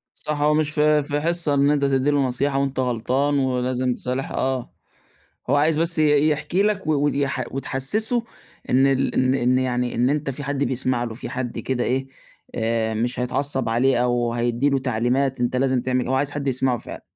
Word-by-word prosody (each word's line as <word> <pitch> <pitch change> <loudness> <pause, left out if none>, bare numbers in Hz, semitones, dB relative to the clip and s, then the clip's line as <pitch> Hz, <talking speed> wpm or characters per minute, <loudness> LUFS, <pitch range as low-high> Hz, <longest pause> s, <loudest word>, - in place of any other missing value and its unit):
صح، 150 -1 -4
هو 150 +1 +3
مش 155 -1 +1
في 150 0 +3
في 145 +1 -2
حصّة 165 -2 +1
إن 140 0 +3
أنت 145 -1 +1
تدّي 135 +1 +2
له 145 -1 +2
نصيحة 135 +2 0
وأنت 140 -1 -2
غلطان 130 +4 0
ولازم 125 -1 0
تصالح 130 +2 -4
آه، 130 -2 -2 0.8
هو - - +4
عايز 150 +2 +2
بس 165 0 +1
ي 150 -1 +4
يحكي 160 +5 0
لَك 205 -4 0
و 155 - +2
ويح 140 -3 0
وتحسسه 140 - -1 0.5
إن 130 +2 +4
ال 135 0 +1
إن 130 0 +2
إن 130 -1 +2
يعني 125 -1 -1
إن 125 +3 +2
أنت 150 -1 -1
في 140 +2 -5
حد 140 0 -1
بيسمع 125 -1 0
له، 115 -2 -5
في 115 - -7
حد 125 -2 -4
كده 125 +2 -2
إيه 130 +1 -1 0.5
آآ، 110 -1 -1
مش 120 +3 -1
هيتعصّب 130 0 0
عليه 125 +3 +2
أو 120 -1 0
هيدّي 120 +3 0
له 135 - +2
تعليمات، 130 +1 0
أنت 125 +1 0
لازم 130 -1 +1
تعمل 130 -1 -1
هو 130 - +1
عايز 140 +1 0
حد 145 -1 -4
يسمعه 130 -1 +1
فعلًا. - - -9
135 Hz, 195 wpm, -22 LUFS, 125-145 Hz, 0.8 s, هو